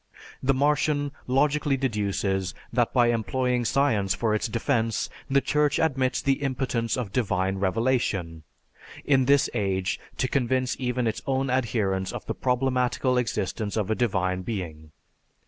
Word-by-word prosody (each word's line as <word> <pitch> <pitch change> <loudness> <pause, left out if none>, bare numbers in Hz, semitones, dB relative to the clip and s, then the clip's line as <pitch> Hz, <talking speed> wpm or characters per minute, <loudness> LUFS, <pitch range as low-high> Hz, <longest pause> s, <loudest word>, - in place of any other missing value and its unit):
The 135 0 +2
Martian 145 +1 +1 0.2
logically 145 +2 +2
deduces 100 -6 -1 0.2
that 120 -1 +2
by 120 -2 +4
employing 125 +2 0
science 110 -7 +2
for 110 -2 0
its 110 +3 0
defense, 115 0 -1 0.2
the 140 0 +3
Church 150 0 +1
admits 135 -5 +1
the 135 +1 +1
impotence 125 -4 -1
of 120 -6 -3
"divine 95 -5 0
revelation," 95 -5 0 0.6
in 135 -2 +3
this 140 +1 +4
age, 95 -2 -1 0.2
to 130 - +1
convince 130 -1 0
even 125 -1 -1
its 110 -1 -1
own 135 -1 0
adherents 105 -7 0
of - - -6
the - - -2
problematical 125 0 +1
existence 105 -2 -2
of 105 -1 0
a - - +4
divine 95 -6 0
being. 85 -7 -5
120 Hz, 140 wpm, -26 LUFS, 100-130 Hz, 0.6 s, by